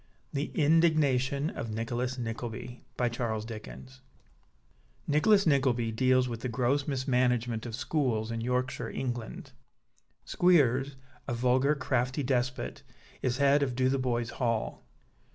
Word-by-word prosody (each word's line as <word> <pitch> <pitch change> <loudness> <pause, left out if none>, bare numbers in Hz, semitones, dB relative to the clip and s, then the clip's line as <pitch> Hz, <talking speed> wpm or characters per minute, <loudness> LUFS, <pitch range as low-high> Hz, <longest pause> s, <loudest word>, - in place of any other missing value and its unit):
THE 140 +1 -2
INDIGNATION 150 -3 +3
OF 115 - -5
NICHOLAS 120 +4 -2
NICKLEBY 120 +1 -6 2.2
("Nicholas 195 +8 +4
Nickleby" 130 -6 +2
deals 130 +2 +3
with 115 -2 -5
the 125 - -4
gross 130 +4 0
mismanagement 125 -4 0
of 115 - -4
schools 120 -6 -1
in 115 0 -3
Yorkshire, 125 +2 -1
England. 120 - -5 0.7
Squeers, 140 -6 +3 0.3
a 120 - -1
vulgar, 130 +4 +2
crafty 130 0 -1
despot, 130 -1 -1 0.4
is 125 0 0
head 140 +1 +4
of 130 -3 -1
Dotheboys 130 -2 0
Hall. 115 -3 -2
130 Hz, 105 wpm, -29 LUFS, 120-140 Hz, 2.2 s, Nicholas